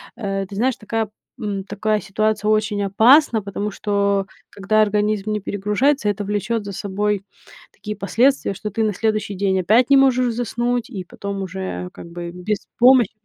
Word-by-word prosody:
э, 195 Hz, -3 st, -3 dB
ты 200 Hz, -, -9 dB
знаешь, 245 Hz, +4 st, +1 dB
такая, 220 Hz, 0 st, -3 dB, 0.3 s
м, 205 Hz, -4 st, -4 dB
такая 215 Hz, +1 st, -1 dB
ситуация 210 Hz, +1 st, -1 dB
очень 215 Hz, -1 st, +1 dB
опасна, 225 Hz, +5 st, +5 dB
потому 200 Hz, +1 st, -4 dB
что 200 Hz, -1 st, 0 dB, 0.2 s
когда 210 Hz, +2 st, +1 dB
организм 210 Hz, 0 st, +1 dB
не 210 Hz, -, -2 dB
перегружается, 210 Hz, +7 st, 0 dB
это 205 Hz, 0 st, -1 dB
влечет 210 Hz, +2 st, -2 dB
за 200 Hz, -, -6 dB
собой 200 Hz, +1 st, -2 dB, 0.5 s
такие 210 Hz, 0 st, -7 dB
последствия, 240 Hz, +4 st, +2 dB
что 210 Hz, +2 st, -6 dB
ты 220 Hz, +2 st, 0 dB
на 215 Hz, -1 st, +1 dB
следующий 215 Hz, +1 st, -1 dB
день 190 Hz, 0 st, 0 dB
опять 220 Hz, +8 st, +3 dB
не 275 Hz, -, +7 dB
можешь 255 Hz, -3 st, +3 dB
заснуть, 240 Hz, 0 st, -2 dB
и 200 Hz, -7 st, -6 dB
потом 200 Hz, +2 st, -6 dB
уже, 185 Hz, -, -5 dB
как -, -, -10 dB
бы, 170 Hz, 0 st, -6 dB
без 185 Hz, +4 st, -4 dB
помощи 245 Hz, -3 st, +6 dB
210 Hz, 170 wpm, -21 LUFS, 195-225 Hz, 0.5 s, не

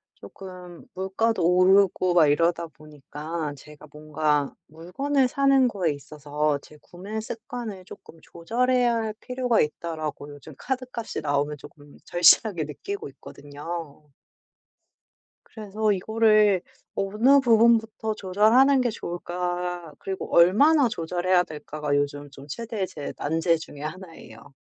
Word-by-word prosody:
쪼끔 180 Hz, -2 st, -12 dB
물가도 190 Hz, +1 st, -1 dB
오르고 185 Hz, 0 st, +4 dB
막 165 Hz, -4 st, +5 dB
이러다 170 Hz, +3 st, +1 dB
보니까 150 Hz, +1 st, -7 dB
제가 150 Hz, +2 st, -14 dB
뭔가 150 Hz, -1 st, -1 dB
물건을 255 Hz, -, -1 dB
사는 275 Hz, 0 st, +3 dB
거에 185 Hz, -8 st, -1 dB
있어서 150 Hz, +1 st, -3 dB
제 150 Hz, -, -17 dB
구매 195 Hz, +7 st, -7 dB
습관을 220 Hz, -3 st, -7 dB
쪼끔 165 Hz, -2 st, -14 dB
조절해야 240 Hz, +8 st, 0 dB
할 220 Hz, -2 st, -2 dB
필요가 250 Hz, -2 st, 0 dB
있다라고 155 Hz, -1 st, -3 dB
요즘 145 Hz, +2 st, -13 dB
카드값이 255 Hz, -3 st, -4 dB
나오면 145 Hz, 0 st, -1 dB
쪼끔 145 Hz, 0 st, -15 dB
절실하게 175 Hz, +1 st, +4 dB
느끼고 400 Hz, -, -6 dB
있거든요. 150 Hz, +1 st, -9 dB, 1.4 s
그래서 215 Hz, 0 st, -1 dB
이거를 215 Hz, 0 st, +3 dB, 0.3 s
어느 220 Hz, +8 st, +3 dB
부분부터 225 Hz, -2 st, +3 dB
조절하는 220 Hz, +9 st, +4 dB
게 245 Hz, -1 st, +1 dB
좋을까 175 Hz, -2 st, -4 dB
그리고 190 Hz, -1 st, -5 dB
얼마나 255 Hz, -, +5 dB
조절해야 180 Hz, -1 st, +1 dB
될까가 150 Hz, -1 st, -5 dB
요즘 145 Hz, 0 st, -2 dB
좀 140 Hz, 0 st, -13 dB
최대의 220 Hz, -, -4 dB
제 150 Hz, -6 st, -7 dB
난제 165 Hz, +3 st, +1 dB
중 160 Hz, -, -11 dB
하나예요. 155 Hz, -7 st, -10 dB
180 Hz, 285 characters per minute, -25 LUFS, 155-220 Hz, 1.4 s, 막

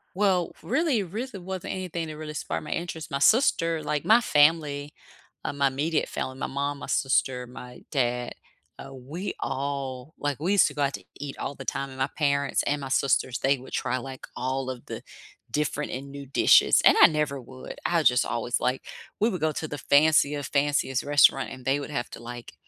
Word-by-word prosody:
Well, 190 Hz, -3 st, +1 dB
really 265 Hz, -4 st, +1 dB
reason 200 Hz, 0 st, -6 dB
wasn't 190 Hz, -2 st, -4 dB
anything 175 Hz, -3 st, -4 dB
that 155 Hz, -, -7 dB
really 155 Hz, 0 st, -6 dB
sparked 150 Hz, -, -3 dB
my 150 Hz, -, -7 dB
interest. 165 Hz, -2 st, -4 dB
My 140 Hz, -, -1 dB
sister, 165 Hz, -, +3 dB
like 150 Hz, 0 st, -2 dB
my 225 Hz, +3 st, +6 dB
family, 150 Hz, -4 st, +2 dB, 0.5 s
uh, -, -, -2 dB
my 140 Hz, -1 st, +2 dB
immediate 150 Hz, +4 st, -1 dB
family, 130 Hz, 0 st, -4 dB
my -, -, -3 dB
mom, 140 Hz, +1 st, -2 dB
my -, -, -7 dB
sister, 130 Hz, -1 st, +1 dB
my 125 Hz, 0 st, -11 dB
dad, 125 Hz, -3 st, 0 dB, 0.5 s
uh, 135 Hz, -, -9 dB
we 145 Hz, +9 st, -6 dB
all, 135 Hz, 0 st, -4 dB
like, 145 Hz, -2 st, -2 dB
we 175 Hz, +6 st, +1 dB
used 205 Hz, -, +6 dB
to -, -, -5 dB
go 145 Hz, -, -3 dB
out 140 Hz, 0 st, 0 dB
to -, -, -7 dB, 0.2 s
eat 145 Hz, -1 st, -6 dB
all -, -, -4 dB
the 135 Hz, -1 st, -10 dB
time, 135 Hz, +1 st, -2 dB
and 130 Hz, -, -11 dB
my 130 Hz, -, +2 dB
parents 140 Hz, -2 st, +1 dB
and 145 Hz, 0 st, -1 dB
my 135 Hz, -, -5 dB
sisters, 130 Hz, -2 st, +1 dB
they 135 Hz, +1 st, +2 dB
would 130 Hz, +1 st, -13 dB
try, 130 Hz, 0 st, -1 dB
like, 130 Hz, +1 st, -8 dB
all 130 Hz, 0 st, -2 dB
of 125 Hz, -2 st, -7 dB
the -, -, -7 dB, 0.5 s
different 150 Hz, 0 st, -1 dB
and 140 Hz, +2 st, -6 dB
new 140 Hz, 0 st, -8 dB
dishes, 135 Hz, -, +5 dB
and -, -, +8 dB
I -, -, +11 dB
never 150 Hz, -3 st, -1 dB
would. 130 Hz, +1 st, -10 dB
I 170 Hz, -1 st, +2 dB
just 125 Hz, -3 st, +4 dB
always, 120 Hz, +1 st, -1 dB
like 125 Hz, +1 st, -1 dB, 0.4 s
we 220 Hz, -, +3 dB
would 185 Hz, -7 st, -4 dB
go 155 Hz, 0 st, +2 dB
to 155 Hz, +1 st, -4 dB
the 145 Hz, -, -5 dB
fanciest, 145 Hz, 0 st, +3 dB
fanciest 140 Hz, -2 st, +1 dB
restaurant, 145 Hz, -1 st, +4 dB
and 130 Hz, -, -10 dB
they 135 Hz, +2 st, +2 dB
would 145 Hz, -, -6 dB
have 130 Hz, -5 st, -3 dB
to, 115 Hz, -, -9 dB
like, 120 Hz, 0 st, -8 dB
140 Hz, 205 wpm, -26 LUFS, 130-155 Hz, 0.5 s, I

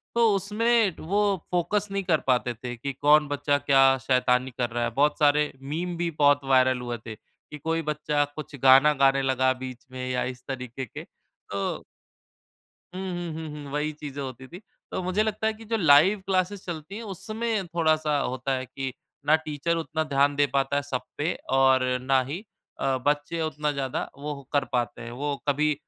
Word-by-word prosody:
तो 235 Hz, -1 st, +5 dB
उसमें 215 Hz, 0 st, +2 dB
वो 200 Hz, +4 st, +1 dB, 0.2 s
फोकस 180 Hz, +4 st, 0 dB
नहीं 195 Hz, 0 st, -1 dB
कर 170 Hz, -4 st, +2 dB
पाते 125 Hz, -1 st, +2 dB
थे 120 Hz, +1 st, -7 dB
कि 140 Hz, +4 st, -4 dB
कौन 150 Hz, +1 st, +5 dB
बच्चा 145 Hz, 0 st, +1 dB
क्या 135 Hz, -1 st, +4 dB
शैतानी 125 Hz, 0 st, +2 dB
कर 120 Hz, -2 st, 0 dB
रहा 120 Hz, +1 st, -2 dB
है? 120 Hz, -, 0 dB
बहुत 145 Hz, +5 st, +1 dB
सारे 150 Hz, 0 st, +3 dB
मीम 165 Hz, +6 st, -3 dB
भी 170 Hz, 0 st, 0 dB
बहुत 145 Hz, -1 st, +5 dB
वायरल 130 Hz, -1 st, +3 dB
हुए 120 Hz, -1 st, -4 dB
थे, 110 Hz, -1 st, -6 dB
कि 150 Hz, -, -15 dB
कोई 165 Hz, +3 st, -1 dB
बच्चा 150 Hz, -1 st, 0 dB
कुछ 155 Hz, -1 st, -7 dB
गाना 135 Hz, +3 st, +7 dB
गाने 135 Hz, 0 st, +5 dB
लगा 130 Hz, -1 st, +2 dB
बीच 130 Hz, -1 st, -8 dB
में 130 Hz, 0 st, -5 dB
या 125 Hz, 0 st, 0 dB
इस 125 Hz, 0 st, -6 dB
तरीके 130 Hz, -1 st, -5 dB
के 110 Hz, -, -9 dB
तो 100 Hz, 0 st, -6 dB, 1.1 s
हुँ, 185 Hz, -, -4 dB
हुँ, 175 Hz, -2 st, -4 dB
हुँ, 160 Hz, 0 st, -6 dB
हुँ 150 Hz, -2 st, -8 dB
वही 150 Hz, +1 st, -1 dB
चीज़ें 145 Hz, -2 st, -7 dB
होती 130 Hz, -1 st, -7 dB
थीं, 175 Hz, +6 st, -10 dB, 0.3 s
तो -, -, -2 dB
मुझे 185 Hz, +4 st, +1 dB
लगता 220 Hz, 0 st, -1 dB
है 220 Hz, -, +1 dB
कि 225 Hz, +1 st, -13 dB
जो 225 Hz, +1 st, 0 dB
लाइव 170 Hz, +3 st, +5 dB
क्लासेस 190 Hz, +1 st, 0 dB
चलती 170 Hz, +2 st, -6 dB
हैं, 230 Hz, -, -6 dB
उसमें 220 Hz, -1 st, -3 dB
थोड़ा-सा 155 Hz, -3 st, +1 dB
होता 130 Hz, 0 st, -2 dB
है 130 Hz, 0 st, -4 dB
कि 135 Hz, 0 st, -5 dB, 0.3 s
ना 155 Hz, -, +6 dB
टीचर 155 Hz, +1 st, -2 dB
उतना 160 Hz, 0 st, -2 dB
ध्यान 145 Hz, -1 st, +2 dB
दे 145 Hz, 0 st, +3 dB
पाता 140 Hz, +1 st, +1 dB
है 145 Hz, -, +2 dB
सब 130 Hz, -3 st, -3 dB, 0.2 s
पे 155 Hz, +4 st, 0 dB, 0.3 s
और 130 Hz, -1 st, +5 dB, 0.2 s
ना 130 Hz, 0 st, +3 dB
ही 160 Hz, +5 st, -3 dB, 0.4 s
अ, 135 Hz, -1 st, +1 dB
बच्चे 145 Hz, +3 st, 0 dB
उतना 150 Hz, -1 st, -1 dB
ज़्यादा 135 Hz, -3 st, -3 dB
वो 145 Hz, 0 st, -5 dB
कर 140 Hz, -2 st, +2 dB
पाते 120 Hz, -1 st, -1 dB
हैं। 115 Hz, 0 st, -7 dB
वो 140 Hz, +4 st, -2 dB
कभी 150 Hz, +2 st, +2 dB
145 Hz, 190 wpm, -26 LUFS, 130-165 Hz, 1.1 s, गाना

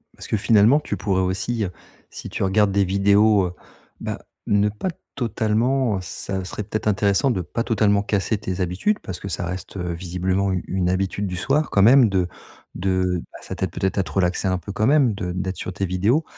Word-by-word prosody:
Parce -, -, -10 dB
que -, -, 0 dB
finalement 110 Hz, +6 st, +5 dB
tu 150 Hz, -, -4 dB
pourrais 95 Hz, -3 st, 0 dB
aussi, 100 Hz, +5 st, -1 dB
heu, 90 Hz, -, -5 dB, 0.4 s
si -, -, -8 dB
tu -, -, -3 dB
regardes 100 Hz, +1 st, +3 dB
des 100 Hz, 0 st, +3 dB
vidéos 100 Hz, +1 st, +4 dB
heu, 90 Hz, -, -7 dB, 0.5 s
bah, -, -, -4 dB, 0.3 s
ne 105 Hz, 0 st, +3 dB
pas 105 Hz, -, -4 dB, 0.3 s
totalement, 115 Hz, +1 st, +1 dB
heu -, -, -3 dB
ça 95 Hz, +2 st, -5 dB
serait 105 Hz, -, -5 dB
peut-être 110 Hz, +1 st, -3 dB
intéressant 100 Hz, +5 st, +2 dB
de 95 Hz, -, -1 dB
pas 115 Hz, +6 st, -3 dB
totalement 105 Hz, -3 st, +2 dB
casser 105 Hz, +1 st, 0 dB
tes 95 Hz, -2 st, -4 dB
habitudes, 90 Hz, -, 0 dB
parce 95 Hz, -, -7 dB
que -, -, -7 dB
ça 90 Hz, -2 st, -3 dB
reste, 90 Hz, +2 st, -6 dB
heu, 90 Hz, -2 st, -3 dB
visiblement 90 Hz, +3 st, -1 dB
u 90 Hz, -2 st, -1 dB
une 90 Hz, -1 st, 0 dB
habitude 95 Hz, +2 st, -1 dB
du 90 Hz, -, -4 dB
soir, 135 Hz, -, +1 dB
quand 100 Hz, -, +3 dB
même, 125 Hz, +1 st, +7 dB
de 95 Hz, -3 st, +1 dB, 0.5 s
de 90 Hz, -1 st, 0 dB
bah, -, -, -11 dB
ça -, -, -6 dB
t'aide -, -, -2 dB
peut -, -, -3 dB
être 95 Hz, -, -1 dB
à -, -, +2 dB
te 85 Hz, -, -9 dB
relaxer 90 Hz, +2 st, 0 dB
un 95 Hz, -1 st, +1 dB
peu 90 Hz, +3 st, -7 dB
quand 110 Hz, +2 st, +1 dB
même, 135 Hz, -5 st, +4 dB
de 90 Hz, -3 st, -3 dB
d'être 95 Hz, +1 st, -3 dB
sur 95 Hz, -, -5 dB
tes 95 Hz, +3 st, -2 dB
vidéos. 100 Hz, -, +1 dB
100 Hz, 220 wpm, -22 LUFS, 95-110 Hz, 0.5 s, même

